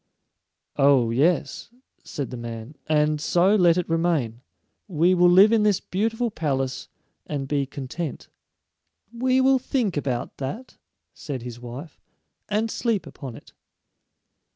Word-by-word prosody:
"Oh, 135 -5 +4
yes," 155 +9 0 0.3
said 140 -3 -5
the - - -5
man; 115 +2 -7 0.2
"and 150 -1 +2
so 180 +5 +3
let 175 -4 +4
it 180 - -1
remain. 160 -9 0 0.5
We 175 -1 +3
will 175 -1 +5
live 190 +5 +7
in 225 -2 +4
this 210 -3 +3
beautiful 225 +4 -1
palace 135 -7 -2 0.4
and 140 -2 -3
be 140 -1 0
content." 140 +4 -6 0.9
"We 255 +2 +1
will 265 0 +4
think 245 - -1
about 130 -4 -3
that," 185 - -6 0.4
said 135 -5 -6
his 120 -1 -8
wife, 125 +6 -9 0.5
"and 215 +2 0
sleep 230 -5 -1
upon 130 -5 -9
it." - - -15
155 Hz, 130 wpm, -24 LUFS, 135-200 Hz, 0.9 s, live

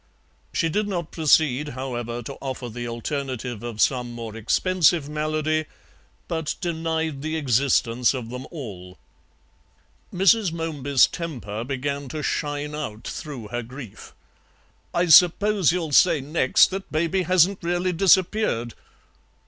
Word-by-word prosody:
She 165 - 0
did 205 +6 -1
not 175 -5 -3
proceed, 150 -3 +2
however, 120 -2 -4
to 140 - -6
offer 130 -2 -5
the 120 +1 -6
alternative 125 -1 -4
of 120 -2 -7
some 125 -1 +1
more 115 -2 -7
expensive 165 - +2
malady, 155 +1 -1 0.6
but 160 -2 -2
denied 160 -4 -2
the 155 +2 -3
existence 125 -3 +2
of 120 -3 -6
them 125 +1 -7
all. 95 - -9 1.1
Mrs. 195 +1 +3
Momeby's 145 -5 +2
temper 120 -11 -5
began 140 +1 -3
to 155 +1 -5
shine 145 0 -2
out 115 -8 -5
through 130 -9 -7
her 120 +1 -3
grief. 125 -1 -11 0.8
"I 175 - +1
suppose 180 +3 +5
you'll 170 -3 -2
say 165 +2 +5
next 140 +2 +3
that 195 +1 -6
Baby 165 +4 0
hasn't 185 +2 +3
really 175 +1 0
disappeared." 180 - +2
150 Hz, 125 wpm, -24 LUFS, 125-170 Hz, 1.1 s, suppose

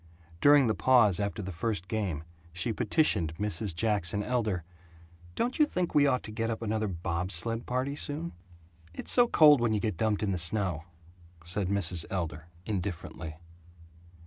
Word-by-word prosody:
During 145 +2 +6
the 110 - +2
pause 110 -6 +4
after 100 +1 -3
the 95 - -5
first 95 +1 -3
game 90 -7 -2 0.3
she 85 +7 -1
petitioned 90 - +1
Mrs. 105 -2 -1
Jackson 105 -1 +1
Elder, 110 -7 -1 0.7
"Don't 245 +5 -1
you 300 - +7
think 180 -8 -2
we 145 -1 +5
ought 125 -2 +1
to 110 - -7
get 115 +1 -2
up 115 0 -4
another 110 0 -1
bob 90 0 -3
sled 115 +6 -2
party 130 +3 -1
soon?" 155 +3 -4 0.6
"It's - - -3
so 245 -1 +5
cold 150 - +6
when 115 -2 +1
you - - 0
get 105 -5 -2
dumped 110 0 0
in 100 - 0
the 90 - -2
snow," 85 -3 0 0.6
said 90 +3 -1
Mrs. 90 -4 +1
Elder, 80 -4 -4 0.2
indifferently. 90 -5 -5
105 Hz, 165 wpm, -29 LUFS, 90-120 Hz, 0.7 s, you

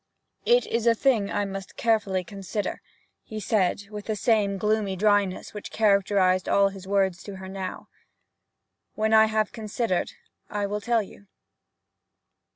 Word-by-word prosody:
'It 485 +1 +5
is 230 0 -1
a 230 - +5
thing 225 -5 +2
I 205 - -1
must 195 -1 -7
carefully 210 -5 +1
consider,' 195 +2 -4 0.4
he 215 - -7
said, 200 -1 0
with 210 -1 -7
the 215 - -2
same 210 -2 +2
gloomy 210 -1 0
dryness 205 -1 +1
which 210 - -7
characterized 200 -3 +2
all 200 0 +4
his 195 -1 -11
words 190 -2 +1
to 200 - -8
her 190 0 -8
now. 190 -1 -6 1.1
'When 220 0 +1
I 220 0 +8
have 215 -1 0
considered, 215 -3 -2 0.4
I 205 -1 -2
will 205 +1 -3
tell 230 +1 +1
you.' 200 0 -15
205 Hz, 150 wpm, -26 LUFS, 195-220 Hz, 1.1 s, I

